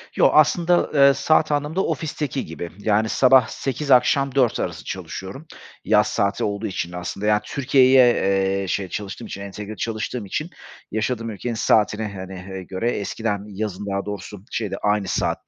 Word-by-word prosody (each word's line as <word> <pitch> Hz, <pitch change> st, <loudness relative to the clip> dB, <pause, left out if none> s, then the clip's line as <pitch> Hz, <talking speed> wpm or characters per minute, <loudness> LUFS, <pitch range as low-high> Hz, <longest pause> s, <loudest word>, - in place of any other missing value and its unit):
Yo, -, -, +5 dB
aslında, 170 Hz, +3 st, +4 dB
eee, 140 Hz, -1 st, +6 dB
saat 155 Hz, +3 st, +2 dB
anlamında 150 Hz, +6 st, 0 dB
ofisteki 145 Hz, -4 st, -3 dB
gibi. 80 Hz, +2 st, -7 dB
Yani 105 Hz, +1 st, +1 dB
sabah 130 Hz, -3 st, +5 dB
08.00 140 Hz, +4 st, -3 dB
akşam 135 Hz, +2 st, +4 dB
16.00 125 Hz, -4 st, +2 dB
arası -, -, -4 dB
çalışıyorum, 95 Hz, +11 st, -7 dB, 0.4 s
yaz 105 Hz, -1 st, +4 dB
saati 100 Hz, -2 st, 0 dB
olduğu 100 Hz, -1 st, -2 dB
için 90 Hz, -2 st, -4 dB
aslında. 90 Hz, +3 st, -5 dB
Yani 105 Hz, 0 st, +3 dB
Türkiye’ye, 130 Hz, -2 st, +4 dB
eee, 95 Hz, -1 st, 0 dB
şey, 95 Hz, +1 st, -2 dB
çalıştığım 100 Hz, +2 st, -6 dB
için, 100 Hz, -, -7 dB
entegre 100 Hz, +2 st, -7 dB
çalıştığım 110 Hz, +2 st, -4 dB
için 150 Hz, -, -3 dB, 0.4 s
yaşadığım 115 Hz, +2 st, -2 dB
ülkenin 115 Hz, +3 st, -4 dB
saatine, 105 Hz, -1 st, +1 dB
hani, 95 Hz, 0 st, -7 dB, 0.2 s
eee, 95 Hz, -1 st, -6 dB
göre, 95 Hz, +6 st, -2 dB
eskiden 105 Hz, 0 st, -2 dB
yazın 105 Hz, -1 st, -5 dB
daha 100 Hz, 0 st, -2 dB
doğrusu 105 Hz, -1 st, -7 dB
şeydi, 110 Hz, -4 st, -3 dB
aynı 105 Hz, -1 st, +1 dB
saat -, -, -2 dB
105 Hz, 160 wpm, -22 LUFS, 100-130 Hz, 0.4 s, eee